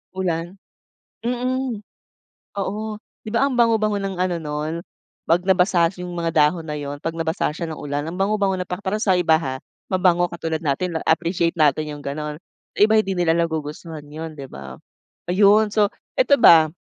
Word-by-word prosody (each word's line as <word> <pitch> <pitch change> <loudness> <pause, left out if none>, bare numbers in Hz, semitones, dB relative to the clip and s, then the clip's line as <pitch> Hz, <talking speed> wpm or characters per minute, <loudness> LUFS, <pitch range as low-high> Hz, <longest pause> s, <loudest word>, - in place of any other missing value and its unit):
Ulan. 175 -1 -2 0.7
Mm, 250 -1 -1 0.8
oo. 200 +2 -2 0.4
'Di - - -7
ba, 230 - +3
ang 280 - -1
bango-bango 215 -3 +3
ng 195 -1 -3
ano 180 -1 0
nun, 150 0 -3 0.5
'pag 170 +2 +3
nabasa 180 -2 +3
yung 180 0 -6
mga 170 -1 -1
dahon 160 +2 +2
na 150 -1 -4
yun, 145 0 -5
'pag 165 - -2
nabasa 165 0 -1
siya 165 +2 -5
ng 155 - -6
ulan, 145 +1 -3
ang 165 - -5
bango-bango 200 -1 +1
na 180 0 -4
pa 180 - -4
para 205 +1 -2
sa 195 -4 +3
iba 165 -2 +4
ha. 135 -5 -4 0.4
Mabango, 175 -1 +3
katulad 165 -2 -3
natin 165 +4 -1
na-appreciate 170 +1 0
natin 150 +1 +2
yung 145 - -7
gano'n. 150 +2 -5 0.3
Sa - - -10
iba 215 +1 +5
hindi 215 -3 +2
nila 165 -2 +3
nagugustuhan 160 -1 -3
yun, 155 +2 -7
'di 135 - -7
ba. 65 - -10 0.5
Ayun 205 +3 +5
so, 205 -1 +2 0.3
ito - - +5
ba 160 -7 +8
170 Hz, 175 wpm, -22 LUFS, 155-195 Hz, 0.8 s, ba